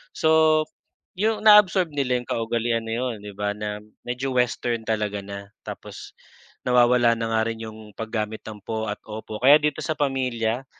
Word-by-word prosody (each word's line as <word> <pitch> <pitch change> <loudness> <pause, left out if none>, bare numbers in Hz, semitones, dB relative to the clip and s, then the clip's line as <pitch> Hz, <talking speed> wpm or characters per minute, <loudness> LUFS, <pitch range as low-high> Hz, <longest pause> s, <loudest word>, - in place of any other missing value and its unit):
So 160 -1 +4 0.5
'yong 215 +3 +1
na-absorb 195 -4 +6
nila 130 -3 +1
'yong 120 - -16
kaugalian 115 0 -1
na 115 - -3
'yon 125 -2 -2
'di 105 -1 -9
ba, 105 0 -1
na 105 0 -4 0.2
medyo 130 +2 -3
Western 120 -2 0
talaga 105 -2 -1
na. 100 0 -8 0.2
Tapos - - -9 0.5
nawawala 120 -1 +4
na 115 0 -2
nga 110 - +3
rin 115 0 -5
'yong 110 -1 -9
paggamit 110 -1 -3
ng 110 -1 -7
po 110 +1 -3
at 105 - -3
opo, 110 0 -7
kaya 140 +4 +8
dito 150 -1 -1
sa 155 - 0
pamilya, 130 -3 -1
115 Hz, 165 wpm, -24 LUFS, 110-135 Hz, 0.5 s, kaya